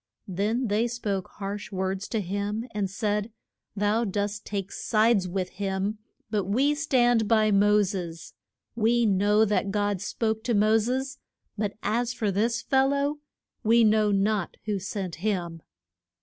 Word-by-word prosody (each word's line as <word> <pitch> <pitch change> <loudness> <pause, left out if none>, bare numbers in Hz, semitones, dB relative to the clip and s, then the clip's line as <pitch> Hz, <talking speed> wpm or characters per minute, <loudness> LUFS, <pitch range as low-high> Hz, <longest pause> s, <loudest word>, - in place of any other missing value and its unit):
Then 210 +7 -1
they 220 +2 +1
spoke 210 -6 -3
harsh 205 +1 -6
words 190 +1 -2
to 220 - -1
him, 205 +5 -3
and 205 -2 -1
said, 210 +2 -1 0.4
Thou 210 +3 +1
dost 205 0 -3
take 200 -1 -3
sides 215 -3 +2
with 185 0 -2
him, 195 +2 -2 0.3
but 205 -4 0
we 260 +10 +2
stand 245 -7 +2
by 215 -1 +3
Mo 205 +1 +4
ses. 175 -4 -5 0.4
We 235 +1 +3
know 205 +2 +3
that 205 -1 0
God 205 -2 0
spoke 220 +1 -2
to 235 -2 +1
Mo 215 +2 +4
ses; 260 +4 -2 0.4
but 205 -1 -3
as 235 +3 0
for 215 -3 0
this 230 +4 0
fel 265 0 +3
low, 280 +1 0 0.4
we 230 +1 +5
know 215 -1 +4
not 200 -1 0
who 210 -2 -1
sent 190 -2 -5
him. 175 -4 -2
210 Hz, 150 wpm, -26 LUFS, 195-225 Hz, 0.4 s, we